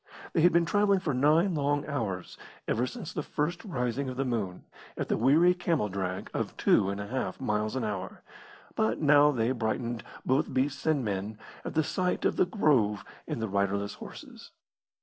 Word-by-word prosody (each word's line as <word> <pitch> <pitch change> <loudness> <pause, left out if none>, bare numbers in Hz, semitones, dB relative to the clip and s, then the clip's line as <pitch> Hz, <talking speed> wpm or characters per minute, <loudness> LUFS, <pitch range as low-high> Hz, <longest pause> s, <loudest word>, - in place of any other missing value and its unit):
They 165 - +3
had 175 +2 +6
been 170 0 +3
travelling 205 +2 +3
for 165 -6 -2
nine 155 +8 +3
long 145 -1 0
hours, 110 - -3 0.3
ever 120 +3 +1
since 205 - -7
the - - -2
first 150 +4 -2
rising 130 - -2
of 125 - -6
the 135 - 0
moon, 105 -8 -2 0.3
at - - -3
the - - +2
weary 155 +9 +5
camel 170 -10 0
drag 95 -1 -4
of - - -3
two 95 - +3
and 100 0 -3
a 100 - -4
half 110 -5 -3
miles 105 +2 -1
an 130 - -1
hour, 100 -3 -4 0.5
but 110 0 0
now 145 -1 +6
they 120 -4 +1
brightened, 115 -1 -2 0.2
both 135 +4 +1
beasts 135 +3 0
and 145 -6 +2
men, 100 +1 -3 0.3
at - - -6
the 160 - +3
sight 180 +4 -1
of - - +2
the - - +3
grove 130 - +2 0.2
and 115 - -3
the - - 0
riderless 100 0 0
horses. - - -11
130 Hz, 190 wpm, -29 LUFS, 105-155 Hz, 0.5 s, had